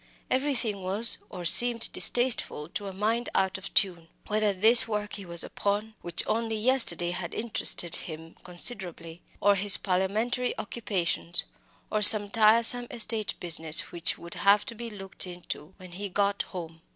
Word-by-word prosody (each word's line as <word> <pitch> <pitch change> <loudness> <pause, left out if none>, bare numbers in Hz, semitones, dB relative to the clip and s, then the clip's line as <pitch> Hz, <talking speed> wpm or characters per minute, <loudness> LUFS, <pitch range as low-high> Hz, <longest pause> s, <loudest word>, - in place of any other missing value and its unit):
Everything 255 -7 -2
was 200 +5 +2
or 175 - -10
seemed 235 +5 +3
distasteful 240 -11 +1
to 200 +3 -8
a - - -7
mind 220 +5 -3
out 190 0 -1
of 195 - -11
tune 175 -4 0 0.2
whether 215 -1 -1
this 220 +5 +7
work 210 -1 -5
he 200 -3 -8
was 170 0 -2
upon, 205 +2 -4
which 170 -1 0
only 225 0 -3
yesterday 215 -7 0
had 175 -1 -7
interested 210 -6 0
him 160 0 -11
considerably, 175 -3 -6 0.2
or 205 +1 +3
his 200 +1 +3
Parliamentary 210 +7 -3
occupations, 180 -6 0 0.5
or 215 - -2
some 205 -1 +8
tiresome 230 +2 +4
estate 220 -2 -2
business 165 -2 +2
which 170 0 -2
would 170 0 -12
have 200 +1 +1
to 240 - -8
be 235 +1 -9
looked 195 -3 -4
into 175 -1 -10
when 185 -2 -15
he 200 +3 -8
got 200 +1 -2
home. 165 -3 -10
200 Hz, 155 wpm, -25 LUFS, 175-225 Hz, 0.5 s, some